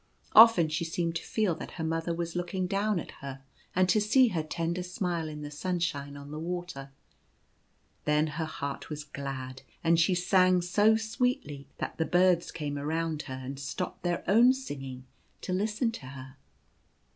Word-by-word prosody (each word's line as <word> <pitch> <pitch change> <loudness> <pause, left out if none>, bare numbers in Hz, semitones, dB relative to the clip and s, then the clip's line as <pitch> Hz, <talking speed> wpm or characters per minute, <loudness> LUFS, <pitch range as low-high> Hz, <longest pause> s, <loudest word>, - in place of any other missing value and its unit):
Often 220 -8 +8
she 155 +2 -1
seemed 165 0 -2
to - - -6
feel 215 -5 0
that 160 - -8
her 165 - -5
mother 165 +1 -1
was 170 0 -3
looking 180 +1 -2
down 200 +1 0
at - - -7
her, 135 -1 -7 0.3
and 185 0 +4
to 210 +3 +4
see 250 +4 +5
her 170 -6 -1
tender 165 +3 -2
smile 175 -2 -2
in 150 -1 -7
the 145 - -6
sunshine 150 -4 -2
on 140 0 -10
the 155 - -5
water; 175 -5 -5 1.2
then 150 +1 +3
her 160 +1 -3
heart 140 -3 -5
Was 150 -1 -5
glad, 135 -3 -6 0.2
and 165 0 +4
she 180 +2 +4
sang 185 0 +4
so 205 +5 +4
sweetly 220 - -2
that - - -5
the 160 - +2
birds 180 -1 +3
came 145 -2 -4
around 160 +1 -1
her 130 0 -5
and 135 +1 -6
stopped 140 +6 -4
their 175 -1 -1
own 235 +6 +6
singing 135 - -7 0.4
to 185 - -3
listen 215 +5 0
to 145 - -9
her. 130 0 -10
165 Hz, 175 wpm, -29 LUFS, 145-185 Hz, 1.2 s, Often